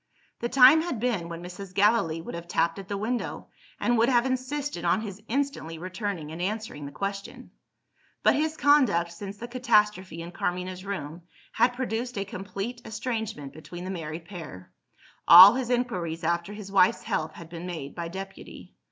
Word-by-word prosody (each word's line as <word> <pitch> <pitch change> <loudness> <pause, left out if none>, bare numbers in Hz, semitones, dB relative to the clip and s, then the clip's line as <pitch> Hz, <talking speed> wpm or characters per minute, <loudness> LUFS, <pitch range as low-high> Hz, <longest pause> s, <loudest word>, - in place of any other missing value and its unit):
The 235 - -2
time 270 +5 +8
had 320 -9 -3
been, 215 -8 -1
when 170 0 -7
Mrs. 180 +1 -9
Gallilee 200 -6 +3
would - - -8
have 170 0 -7
tapped 170 +1 0
at 195 - -9
the 200 -1 -3
window, 230 +4 -3 0.3
and 240 -1 +2
would 235 +3 +4
have 240 -1 +3
insisted 260 -5 -2
on 175 +4 +2
his 205 -2 -7
instantly 270 - -2
returning 185 -2 -4
and 165 +2 -6
answering 195 -7 -4
the - - -9
question. 195 +7 -6 0.7
But - - +5
his 315 +2 0
conduct, 235 - +4
since 195 +3 -8
the 235 - -7
catastrophe 210 -8 +1
in 170 - -8
Carmina's 180 +1 -3
room, 175 -5 -5 0.3
had 245 0 +2
produced 245 -1 -3
a 200 - -1
complete 200 +5 -6
estrangement 220 - -4
between 175 +3 -9
the 185 - -4
married 165 -2 -6
pair. 160 - -9 0.6
All 185 +5 +12
his 250 -1 -2
inquiries 185 -11 -1
after 170 +3 0
his 205 -2 -8
wife's 195 -2 +4
health 155 0 -2
had 165 -1 -11
been 170 +1 -7
made 160 -6 -6
by 170 -1 -5
deputy. 195 +2 -9
195 Hz, 175 wpm, -27 LUFS, 170-235 Hz, 0.7 s, All